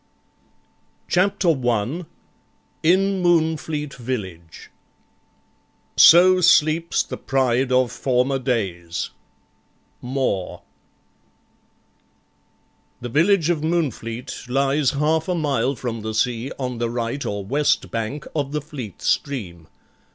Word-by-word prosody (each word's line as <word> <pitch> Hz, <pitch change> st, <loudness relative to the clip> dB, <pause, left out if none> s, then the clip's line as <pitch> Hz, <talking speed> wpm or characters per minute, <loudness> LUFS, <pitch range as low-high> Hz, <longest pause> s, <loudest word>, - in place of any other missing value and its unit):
CHAPTER 185 Hz, 0 st, +2 dB
1 130 Hz, +3 st, -1 dB, 0.7 s
IN 190 Hz, +3 st, +2 dB
MOONFLEET 160 Hz, -4 st, 0 dB
VILLAGE 95 Hz, -10 st, -7 dB, 1.2 s
So 180 Hz, +2 st, +7 dB
sleeps 165 Hz, -1 st, +3 dB
the -, -, -7 dB
pride 130 Hz, -1 st, 0 dB
of 125 Hz, -1 st, +2 dB
former 130 Hz, +1 st, 0 dB
days 95 Hz, -10 st, -3 dB, 0.9 s
More 125 Hz, -7 st, -2 dB, 2.4 s
The 120 Hz, 0 st, -6 dB
village 170 Hz, -, +3 dB
of 160 Hz, -3 st, -1 dB
Moonfleet 130 Hz, -7 st, -3 dB
lies 135 Hz, +1 st, +2 dB
half 155 Hz, +3 st, +1 dB
a 180 Hz, -, 0 dB
mile 140 Hz, -5 st, 0 dB
from 115 Hz, -2 st, -5 dB
the 110 Hz, 0 st, -4 dB
sea 120 Hz, +2 st, -1 dB
on 125 Hz, -3 st, -4 dB
the 120 Hz, -1 st, -1 dB
right 120 Hz, +3 st, -3 dB
or 100 Hz, -1 st, -4 dB
west 145 Hz, +7 st, 0 dB
bank 115 Hz, +6 st, -4 dB
of 145 Hz, -2 st, -2 dB
the 150 Hz, -, -1 dB
Fleet 130 Hz, -, -9 dB
stream. 90 Hz, -, -2 dB
135 Hz, 100 wpm, -22 LUFS, 115-155 Hz, 2.4 s, So